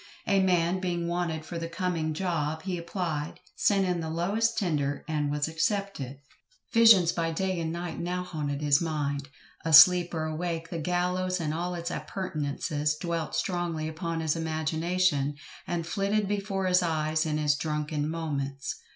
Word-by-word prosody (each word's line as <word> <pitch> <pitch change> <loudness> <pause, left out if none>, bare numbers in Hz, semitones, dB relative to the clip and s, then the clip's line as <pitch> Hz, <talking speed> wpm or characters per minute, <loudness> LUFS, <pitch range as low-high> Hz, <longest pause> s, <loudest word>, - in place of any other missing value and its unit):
A 195 -1 +3
man 180 -1 +2
being 175 -2 -2
wanted 170 -2 -2
for 170 0 -5
the 165 - -3
coming 165 -3 -1
"job," 160 -3 -1
he 185 -1 -2
applied, 170 -3 -3 0.2
sent 195 -2 +3
in 180 -2 0
the 160 -1 -3
"lowest 200 +8 0
tender," 145 -7 -1
and 150 -2 0
was 145 +1 0
accepted. 165 - -2 0.6
Visions 225 -7 +7
by 165 -2 -1
day 185 +2 -1
and 160 -1 -2
night 170 -1 -4
now 180 +1 -2
haunted 150 -4 -3
his 145 0 +4
mind; 145 -4 -2 0.3
asleep 170 +2 +7
or 160 - -1
awake 165 +1 -3
the 170 - -3
gallows 180 +2 0
and 155 -2 -1
all 175 +2 -2
its 170 0 -4
appurtenances 150 -3 -2
dwelt 165 0 -3
strongly 165 -2 -1
upon 165 +1 -3
his 160 -1 0
imagination, 160 -1 0 0.3
and 170 -1 -2
flitted 200 +3 0
before 200 -1 -1
his 180 0 +4
eyes 155 -2 0
in 155 -1 -1
his 150 -1 +3
drunken 150 0 -2
moments. 140 -4 -3
165 Hz, 160 wpm, -28 LUFS, 155-180 Hz, 0.6 s, Visions